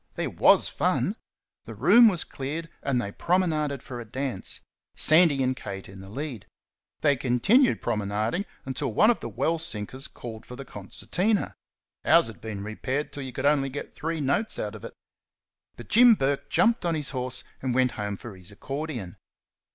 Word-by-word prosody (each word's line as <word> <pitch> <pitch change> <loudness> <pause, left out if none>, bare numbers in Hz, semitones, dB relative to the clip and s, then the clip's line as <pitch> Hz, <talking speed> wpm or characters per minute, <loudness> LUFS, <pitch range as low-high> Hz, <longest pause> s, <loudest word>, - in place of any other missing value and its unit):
there - - -2
WAS - - +5
fun! - - 0 0.5
The 115 - -8
room 220 - +7
was 185 -6 +2
cleared 155 +5 -5
and 135 -3 0
they 100 -4 -3
promenaded 155 - 0
for 120 -2 -7
a - - -6
dance 125 -2 -4 0.3
Sandy 155 -4 +5
and 130 0 +1
Kate 95 -6 -7
in 95 0 -12
the 95 - -11
lead. 130 -2 -6 0.5
They 145 -2 +4
continued 135 - +3
promenading 110 - -1 0.2
until 130 -2 -2
one 215 - +5
of 235 - -2
the - - -6
well 165 0 0
sinkers 130 -3 -3
called 115 -2 -9
for 125 - -10
the 135 +1 -8
concertina 180 - -2 0.5
ours 170 0 +5
had 115 - -8
been 105 -3 -5
repaired 130 +7 -3
till 145 - -5
you 130 -1 -6
could - - -5
get 145 - +6
only 135 -2 -1 0.2
three 165 +1 -3
notes 150 +11 0
out 105 0 -3
of 110 - -10
it; - - -8 0.8
but 120 - -10
Jim 235 +1 +7
Burke 140 -4 -1
jumped 220 +7 +3
on 170 -2 +1
his 150 -2 -2
horse 125 -1 -3 0.2
and 130 -2 -1
went 130 -1 +3
home 105 -1 -4
for 110 -2 -9
his 90 0 -12
accordion. 130 - -6
135 Hz, 180 wpm, -26 LUFS, 110-160 Hz, 0.8 s, room